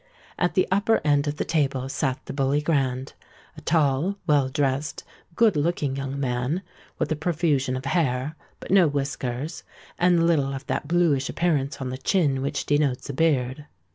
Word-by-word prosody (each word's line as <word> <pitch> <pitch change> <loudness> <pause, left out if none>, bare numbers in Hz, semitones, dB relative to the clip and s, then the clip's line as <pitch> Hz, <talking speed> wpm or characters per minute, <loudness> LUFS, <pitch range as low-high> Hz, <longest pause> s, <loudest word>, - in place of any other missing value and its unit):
At 175 - +1
the 185 - +3
upper 205 +3 +3
end 145 0 +3
of 145 +1 -2
the - - -1
table 135 -5 0
sate 135 -1 -2
the - - -6
Bully 140 +1 +1
Grand—a 135 -4 -3
tall, 155 +4 +1
well 145 -4 +3
dressed, 140 +1 -1 0.3
good 225 -3 +4
looking 145 -3 0
young 135 0 -4
man, 130 +7 -1 0.3
with - - -1
a - - +2
profusion 150 -5 0
of 130 - -7
hair, 140 -2 0 0.2
but - - -8
no 190 -4 +6
whiskers, 140 0 -3 0.4
and 175 -1 +4
little 140 -5 +2
of 135 - -7
that - - -2
blueish 160 -5 +2
appearance 145 -5 0
on 130 -2 -3
the 130 - -5
chin 145 -6 +1
which 140 - -2
denotes 145 -2 0
a - - -8
beard. 140 -2 0
145 Hz, 170 wpm, -25 LUFS, 135-165 Hz, 0.4 s, no